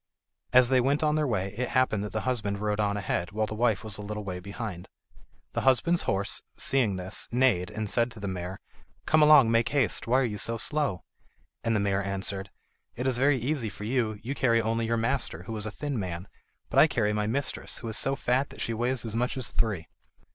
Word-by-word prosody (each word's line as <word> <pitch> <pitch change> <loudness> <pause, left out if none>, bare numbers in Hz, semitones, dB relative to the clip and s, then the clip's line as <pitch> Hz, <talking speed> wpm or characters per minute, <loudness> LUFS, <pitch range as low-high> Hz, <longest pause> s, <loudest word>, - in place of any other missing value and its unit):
As 125 -1 +6
they 130 -1 +4
went 140 +4 +1
on 150 -1 +3
their 155 -1 +1
way, 100 -4 -1
it 125 +2 -2
happened 110 -5 +2
that 105 - -5
the 110 - -2
husband 105 -6 -1
rode 105 0 -1
on 105 -1 +1
ahead, 95 -1 -2
while 110 +1 +1
the 110 - -6
wife 110 -3 +1
was 105 -2 -2
a - - -4
little 105 +1 -5
way 90 -2 -5
behind. 100 -1 -6 0.6
The - - -1
husband's 150 +7 +3
horse, 95 +1 0
seeing 120 -8 0
this, 95 +2 -2
neighed, 120 -7 +2
and 105 0 -4
said 115 +4 +2
to 110 - -11
the 100 - -4
mare: 95 0 -5 0.5
"Come 155 0 +4
along, 150 -6 +7
make 115 0 +3
haste; 130 -9 +1
why 130 +3 +4
are - - +2
you 105 -3 -3
so 115 +3 -1
slow?" 140 - -1 0.6
And 115 -1 +1
the - - +2
mare 100 0 +1
answered: 100 0 -2 0.5
"It 125 - -4
is 130 -2 +1
very 140 +1 +4
easy 125 -2 -1
for 105 - -9
you, 110 -2 -1
you 130 +4 -3
carry 115 -4 +2
only 115 0 0
your 115 0 +1
master, 115 +4 -1
who 115 - -6
is 105 0 -1
a - - -4
thin 140 +2 -3
man, 90 -1 -4 0.4
but - - +4
I - - +8
carry 105 0 0
my 105 0 0
mistress, 135 +5 -2
who 115 - -7
is 110 - -3
so 135 - +1
fat 130 +2 0
that - - -13
she 115 - -1
weights 120 +2 -1
as 110 -1 -3
much 125 +3 -1
as 130 - -3
three." 105 -8 -1
115 Hz, 230 wpm, -28 LUFS, 100-130 Hz, 0.6 s, I